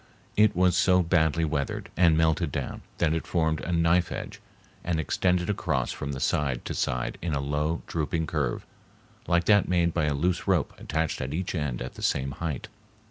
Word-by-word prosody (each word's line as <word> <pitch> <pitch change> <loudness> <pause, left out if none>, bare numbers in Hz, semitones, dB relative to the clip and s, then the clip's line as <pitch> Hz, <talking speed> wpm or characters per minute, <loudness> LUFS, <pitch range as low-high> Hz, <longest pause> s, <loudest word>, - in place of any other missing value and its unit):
It 105 -2 +4
was 90 0 +3
so 90 +1 +4
badly 80 -1 +2
weathered 75 -3 -2
and 85 -2 +4
melted 80 0 +2
down - - -4 0.2
that 80 -2 +2
it 80 - -3
formed 80 -3 0
a 90 - -4
knife 85 +1 +2
edge, - - -6 0.4
and 85 -2 -1
extended 90 +3 +1
across 105 - -1
from 70 - -4
side 65 -2 0
to - - -3
side - - -2
in 80 -3 -1
a - - 0
low, 75 +4 -1
drooping 80 0 -1
curve - - -2 0.6
like 85 0 +3
that 105 +2 +4
made 85 -2 +2
by 85 -3 +1
a 75 -1 0
loose 90 +5 0
rope - - +2
attached 80 +1 -2
at 65 +4 -3
each 95 +2 -2
end 75 -8 -2
at 65 - -7
the - - -11
same 70 -1 0
height. 75 -1 -4
80 Hz, 190 wpm, -27 LUFS, 75-85 Hz, 0.6 s, It